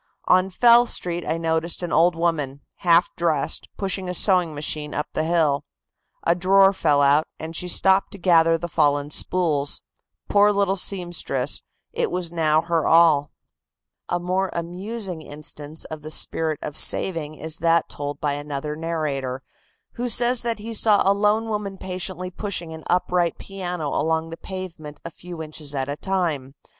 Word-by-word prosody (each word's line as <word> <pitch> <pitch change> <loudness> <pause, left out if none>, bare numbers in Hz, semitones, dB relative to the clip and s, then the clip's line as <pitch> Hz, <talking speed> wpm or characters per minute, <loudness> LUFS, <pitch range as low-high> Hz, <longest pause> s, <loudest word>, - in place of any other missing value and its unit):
On 185 +1 +3
Fell 240 +5 +5
Street 175 -4 0
I 160 - 0
noticed 165 +1 -1
an 175 - -3
old 170 +2 +4
woman, 150 -5 -1 0.2
half 170 -1 +3
dressed, 160 -5 -1
pushing 190 -2 -2
a 180 - -2
sewing 180 -5 +3
machine 150 0 -2
up 150 - -1
the - - 0
hill. 155 -4 +1 0.6
A 170 - +3
drawer 195 +2 +4
fell 150 -6 +2
out, 145 +3 +4
and 160 +1 -7
she 180 - -1
stopped 190 +2 +3
to - - -7
gather 165 -3 +4
the 175 +1 -5
fallen 145 -2 +1
spools. 150 -5 +1 0.5
Poor 205 0 +4
little 200 -1 +1
seamstress, 175 -8 0 0.3
it - - 0
was 180 -2 -3
now 160 -2 +2
her 165 -2 0
all." 160 -3 +5 0.8
A 175 - 0
more 185 +2 -1
amusing 180 +2 -4
instance 150 0 -6
of 155 -1 -8
the 155 - -8
spirit 160 0 +2
of 150 - -5
saving 155 -3 +1
is 160 +1 -5
that 165 0 +2
told 145 0 -6
by 145 -1 -1
another 145 +1 -4
narrator, 145 -5 -3 0.5
who 245 +1 -2
says 240 +1 +3
that 230 -1 -1
he 225 +2 -7
saw 210 -1 +4
a 195 - +5
lone 210 +2 +1
woman 205 -3 -4
patiently 185 -1 -5
pushing 175 -4 -5
an 160 -1 -10
upright 180 -1 +1
piano 180 -5 -5
along 160 +2 -1
the - - -5
pavement 170 -6 -8
a 170 - -6
few 170 -1 -8
inches 150 -2 -6
at 135 -1 -1
a 140 - -3
time. 155 -7 -2
170 Hz, 165 wpm, -23 LUFS, 155-185 Hz, 0.8 s, Fell